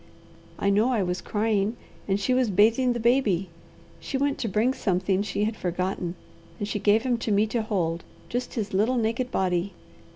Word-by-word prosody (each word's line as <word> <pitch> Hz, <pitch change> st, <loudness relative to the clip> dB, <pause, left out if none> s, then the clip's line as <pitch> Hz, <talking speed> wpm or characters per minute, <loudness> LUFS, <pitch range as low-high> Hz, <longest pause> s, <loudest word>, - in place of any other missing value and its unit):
I 200 Hz, -, +1 dB
know 215 Hz, +5 st, +3 dB
I 230 Hz, -6 st, +1 dB
was 180 Hz, 0 st, -2 dB
crying, 215 Hz, +1 st, 0 dB, 0.3 s
and 195 Hz, 0 st, +1 dB
she 255 Hz, +6 st, +1 dB
was 255 Hz, -2 st, +2 dB
bathing 225 Hz, +6 st, +4 dB
the 240 Hz, -, -3 dB
baby. 220 Hz, -7 st, +2 dB, 0.5 s
She 275 Hz, -, -3 dB
went 280 Hz, +1 st, 0 dB
to 230 Hz, -, -1 dB
bring 220 Hz, +5 st, +2 dB
something 190 Hz, -3 st, 0 dB
she 205 Hz, 0 st, -2 dB
had 215 Hz, +1 st, -1 dB
forgotten, 180 Hz, -1 st, -2 dB, 0.4 s
and 205 Hz, -, -3 dB
she 210 Hz, -, -2 dB
gave 210 Hz, +2 st, +3 dB
him 245 Hz, -2 st, 0 dB
to 225 Hz, -, -2 dB
me 205 Hz, +1 st, +4 dB
to 225 Hz, +2 st, -1 dB
hold, 175 Hz, -6 st, -1 dB, 0.2 s
just 245 Hz, +1 st, -4 dB
his 210 Hz, -5 st, -3 dB
little 220 Hz, +7 st, +2 dB
naked 235 Hz, +2 st, 0 dB
body. 185 Hz, -3 st, 0 dB
210 Hz, 190 wpm, -26 LUFS, 190-235 Hz, 0.5 s, bathing